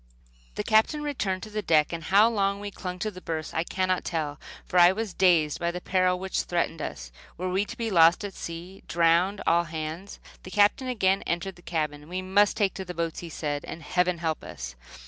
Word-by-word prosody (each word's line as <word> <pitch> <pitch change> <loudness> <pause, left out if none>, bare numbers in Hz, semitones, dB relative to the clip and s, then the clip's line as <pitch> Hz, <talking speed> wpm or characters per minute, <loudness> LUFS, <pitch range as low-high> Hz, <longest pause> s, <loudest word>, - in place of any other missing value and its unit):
The - - -2
Captain 220 +8 +3
returned 200 -11 -2
to 215 - -8
the 215 0 -2
deck, 155 -4 +3
and 165 -1 -5
how 205 +3 +6
long 200 -3 0
we 205 0 -6
clung 180 -2 -6
to 215 +4 -2
the 185 -2 -11
berths 160 -2 -4
I 160 - 0
cannot 185 +1 -1
tell, 150 -3 -3 0.3
for 180 - +2
I 175 +1 +8
was 215 0 -4
dazed 170 -5 +3
by 170 - 0
the 175 +1 -4
peril 185 0 +1
which 190 +1 -2
threatened 170 -2 -1
us - - -6 0.3
Were 185 +1 -2
we 195 +3 +1
to 230 +3 -9
be 230 -2 -2
lost 170 +1 +5
at 200 - -6
sea, 175 +4 -8
drowned, 170 +4 +2
all 170 +1 +3
hands? 160 +4 -6 0.2
The - - -10
Captain 205 +6 +3
again 195 -6 +2
entered 175 +2 -2
the 175 - -17
cabin. 150 -3 -3
"We 185 +1 -3
must 200 +3 +3
take 200 -4 +2
to 190 - -5
the 180 -1 -7
boats," 165 -1 -2
he 170 - -7
said, 145 -2 -3
"and 160 - -8
Heaven 180 +2 +1
help 160 -2 -2
us." - - -7
180 Hz, 220 wpm, -27 LUFS, 165-195 Hz, 0.3 s, I